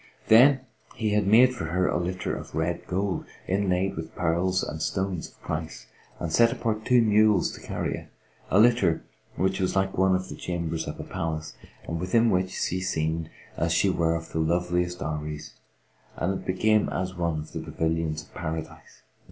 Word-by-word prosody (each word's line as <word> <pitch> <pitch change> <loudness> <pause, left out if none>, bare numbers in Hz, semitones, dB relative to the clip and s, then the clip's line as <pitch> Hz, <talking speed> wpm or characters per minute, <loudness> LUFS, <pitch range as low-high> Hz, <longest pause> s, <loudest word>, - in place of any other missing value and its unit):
Then 130 +4 +7 0.3
he 110 -2 -1
had 105 -2 +2
made 125 +5 +6
for 125 - -4
her 90 +3 +1
a - - +1
litter 90 +1 -2
of - - -8
red 80 +2 -2
gold, 95 +1 -1 0.2
inlaid 95 0 +1
with 80 0 -7
pearls 90 +2 +1
and 80 +1 -5
stones 95 -1 -2
of - - -22
price, 80 0 -4 0.3
and 85 -2 -3
set 115 +4 +5
apart 110 -2 -2
two 125 -2 +5
mules 105 -2 +4
to - - -10
carry - - -3
it; - - -10 0.4
a - - +3
litter 110 -8 +4 0.3
which 95 +1 0
was 95 0 0
like 95 0 +1
one 95 0 +3
of 95 0 -2
the - - -6
chambers 85 -2 -3
of - - -6
a - - -4
palace, 80 -1 -4 0.3
and 85 - -3
within 115 +6 +3
which 90 0 +1
she 95 0 -2
seemed 80 -2 -1 0.3
as - - +1
she - - +3
were 80 -1 +1
of 80 0 -6
the 80 - -2
loveliest 90 +2 0
Houris 75 0 -4 0.6
and 90 +4 0
it 95 - -6
became 110 +3 +2
as 95 0 -2
one 85 -3 -1
of 75 0 -6
the - - -4
pavilions 80 -2 -2
of - - -22
Paradise. 80 +1 -6
90 Hz, 185 wpm, -26 LUFS, 80-100 Hz, 0.6 s, Then